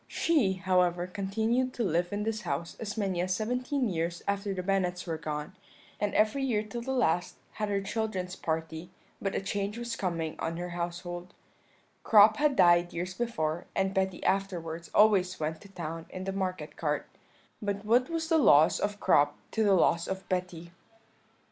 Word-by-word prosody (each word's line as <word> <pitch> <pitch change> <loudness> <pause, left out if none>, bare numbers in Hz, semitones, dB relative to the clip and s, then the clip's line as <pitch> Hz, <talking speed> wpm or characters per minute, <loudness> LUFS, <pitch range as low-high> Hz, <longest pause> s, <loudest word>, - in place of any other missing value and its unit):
"She, 285 - +2
however, 180 -2 +1
continued 220 +7 -1
to 240 - -1
live 175 -2 0
in 205 +1 -2
this 220 0 -2
house 170 -2 -3
as 210 -1 -5
many 190 -4 0
as 185 0 0
seventeen 250 +5 -1
years 170 -2 -2
after 200 0 -1
the 185 -1 -3
Bennets 185 -1 0
were 165 -3 -3
gone, 150 +3 -5 0.4
and 205 -1 -1
every 215 +6 +3
year 225 -5 +1
till 220 +3 -6
the 265 +3 -4
last 180 -9 +1 0.2
had 210 -1 -3
her 200 -1 0
children's 195 -3 -3
party; 160 +1 -3 0.3
but 195 - -2
a - - +1
change 200 +2 -2
was 235 -1 -4
coming 170 -6 -2
on 165 +1 -2
her 175 +1 -4
household 175 +1 -5 0.7
Crop 215 0 +7
had 290 -2 +2
died 175 -2 +5
years 180 +2 -3
before, 175 -8 -2
and 195 0 +1
Betty 190 -1 -1
afterwards 170 -4 -1
always 190 -4 +4
went 155 +1 -3
to 200 - -14
town 165 -3 -6
in 185 - -6
the 195 0 -3
market 185 -1 -3
cart; - - -1 0.6
but 205 0 -3
what 245 +4 +3
was 330 -1 -2
the 325 -1 +3
loss 155 - +6
of 205 0 -2
Crop 145 0 +3
to 220 - +1
the 205 -2 +4
loss 170 -1 +3
of 190 0 -5
Betty? 180 -2 -3
190 Hz, 180 wpm, -29 LUFS, 175-215 Hz, 0.7 s, Crop